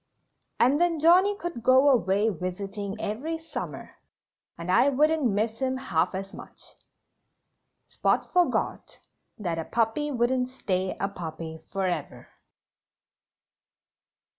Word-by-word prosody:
And 275 Hz, +6 st, +4 dB
then 345 Hz, -2 st, +2 dB
Johnnie 360 Hz, +6 st, +5 dB
could 345 Hz, -, -5 dB
go 260 Hz, +4 st, +5 dB
away 205 Hz, -3 st, +3 dB
visiting 195 Hz, +3 st, -4 dB
every 265 Hz, +11 st, -3 dB
summer 325 Hz, 0 st, -7 dB, 0.6 s
and 170 Hz, +2 st, -3 dB
I 270 Hz, -, +5 dB
wouldn't 300 Hz, +1 st, +2 dB
miss 220 Hz, +2 st, -1 dB
him 260 Hz, -1 st, 0 dB
half 185 Hz, -9 st, 0 dB
as 195 Hz, +1 st, -5 dB
much." -, -, -11 dB, 1.3 s
Spot -, -, 0 dB
forgot 360 Hz, -1 st, 0 dB, 0.4 s
that 170 Hz, -5 st, -3 dB
a 165 Hz, -, -3 dB
puppy 230 Hz, +6 st, 0 dB
wouldn't 250 Hz, 0 st, +1 dB
stay 190 Hz, -7 st, -2 dB
a 195 Hz, -, 0 dB
puppy 160 Hz, -4 st, -7 dB
forever. 190 Hz, -2 st, -3 dB
225 Hz, 115 wpm, -27 LUFS, 190-285 Hz, 1.3 s, Johnnie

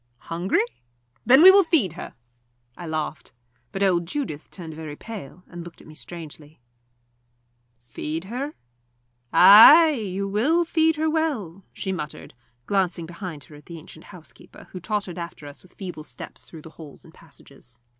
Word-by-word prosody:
"Hungry? 175 Hz, +7 st, 0 dB, 0.6 s
Then 265 Hz, +5 st, +7 dB
we 375 Hz, -, +11 dB
will 395 Hz, +1 st, +6 dB
feed 300 Hz, -, +2 dB
her." 175 Hz, -, -9 dB, 0.6 s
I 175 Hz, -, -9 dB
laughed. 155 Hz, -2 st, -5 dB, 0.4 s
But 195 Hz, -, -2 dB
old 175 Hz, -3 st, +1 dB
Judith 180 Hz, -, -5 dB
turned 165 Hz, -4 st, -9 dB
very 155 Hz, -1 st, -8 dB
pale, 185 Hz, -4 st, -10 dB
and 175 Hz, -1 st, -10 dB
looked 170 Hz, -1 st, -13 dB
at -, -, -16 dB
me 155 Hz, -, -13 dB
strangely. 155 Hz, -2 st, -10 dB, 1.3 s
"Feed 155 Hz, +7 st, -5 dB
her? 255 Hz, +9 st, -6 dB, 0.8 s
Ay 300 Hz, +11 st, +9 dB
you 200 Hz, -7 st, -4 dB
will 280 Hz, -, +1 dB
feed 320 Hz, -1 st, +2 dB
her 315 Hz, +1 st, -1 dB
well," 260 Hz, -, -2 dB
she 190 Hz, -, -5 dB
muttered, 150 Hz, -5 st, -7 dB, 0.3 s
glancing 185 Hz, -4 st, -1 dB
behind 170 Hz, -3 st, -8 dB
her 150 Hz, -, -16 dB
at 145 Hz, -1 st, -17 dB
the 170 Hz, -, -9 dB
ancient 160 Hz, 0 st, -14 dB
housekeeper, 180 Hz, -5 st, -15 dB
who 185 Hz, -, -7 dB
tottered 195 Hz, -2 st, -4 dB
after 170 Hz, -3 st, -8 dB
us 145 Hz, 0 st, -11 dB
with 185 Hz, -, -22 dB
feeble 180 Hz, -6 st, -8 dB
steps -, -, -11 dB
through 160 Hz, -3 st, -13 dB
the 160 Hz, -, -12 dB
halls 150 Hz, +3 st, -13 dB
and 165 Hz, -, -17 dB
passages. 140 Hz, -7 st, -15 dB
180 Hz, 160 wpm, -23 LUFS, 160-220 Hz, 1.3 s, we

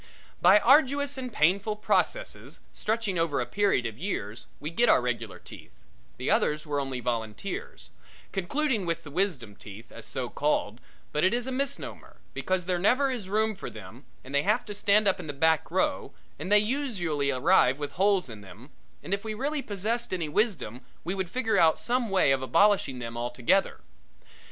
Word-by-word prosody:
By 185 Hz, +4 st, +7 dB
arduous 280 Hz, +3 st, +4 dB
and 255 Hz, -2 st, -5 dB
painful 200 Hz, +5 st, +2 dB
processes, -, -, -1 dB
stretching 215 Hz, -5 st, -1 dB
over 165 Hz, -4 st, 0 dB
a 125 Hz, -, -1 dB
period 200 Hz, -10 st, +1 dB
of 115 Hz, 0 st, -5 dB
years, 115 Hz, -, -4 dB
we 150 Hz, +2 st, -5 dB
get 235 Hz, +8 st, +3 dB
our -, -, +6 dB
regular 115 Hz, -4 st, -3 dB
teeth -, -, -14 dB, 0.4 s
the -, -, -5 dB
others 150 Hz, +1 st, +1 dB
were 145 Hz, -2 st, -1 dB
only 135 Hz, -2 st, -3 dB
volunteers 120 Hz, -, -5 dB, 0.4 s
concluding 220 Hz, -, -1 dB
with 165 Hz, -, -2 dB
the 145 Hz, -, -10 dB
wisdom 145 Hz, -, -1 dB
teeth, 105 Hz, +3 st, -12 dB
as 115 Hz, -2 st, -10 dB
so 125 Hz, -, -3 dB
called, 125 Hz, -5 st, -1 dB, 0.3 s
but 150 Hz, -, 0 dB
it 190 Hz, +5 st, +3 dB
is 240 Hz, 0 st, -2 dB
a 260 Hz, -, -3 dB
misnomer, 275 Hz, +2 st, -4 dB, 0.2 s
because 185 Hz, -2 st, -1 dB
there 180 Hz, -1 st, 0 dB
never 255 Hz, +8 st, +3 dB
is 220 Hz, -7 st, -5 dB
room 220 Hz, +2 st, +1 dB
for 195 Hz, -, -7 dB
them 110 Hz, +6 st, -12 dB, 0.2 s
and 130 Hz, -, -11 dB
they 140 Hz, -, +3 dB
have 210 Hz, +7 st, +1 dB
to 205 Hz, -, -6 dB
stand 205 Hz, +1 st, +3 dB
up 190 Hz, -, +2 dB
in 175 Hz, -, -7 dB
the 145 Hz, -, -4 dB
back 160 Hz, +2 st, +2 dB
row -, -, -1 dB, 0.3 s
and 190 Hz, -, -5 dB
they 210 Hz, -, +8 dB
usually 205 Hz, -, 0 dB
arrive 135 Hz, -1 st, +3 dB
with 145 Hz, -1 st, -5 dB
holes 195 Hz, -1 st, +2 dB
in 110 Hz, -4 st, -10 dB
them, 100 Hz, +8 st, -14 dB, 0.3 s
and 190 Hz, -, -3 dB
if 200 Hz, +1 st, -2 dB
we 215 Hz, -1 st, -4 dB
really 285 Hz, +5 st, -2 dB
possessed 225 Hz, +3 st, -2 dB
any 175 Hz, -4 st, -2 dB
wisdom 150 Hz, -, -1 dB, 0.2 s
we 175 Hz, -, -2 dB
would 190 Hz, -2 st, -3 dB
figure 220 Hz, -2 st, 0 dB
out 160 Hz, -1 st, +5 dB
some 240 Hz, +1 st, 0 dB
way 190 Hz, -8 st, +3 dB
of 135 Hz, -1 st, +2 dB
abolishing 165 Hz, -1 st, +3 dB
them 115 Hz, -1 st, -6 dB
altogether. 120 Hz, +10 st, 0 dB
180 Hz, 185 wpm, -27 LUFS, 135-215 Hz, 0.4 s, they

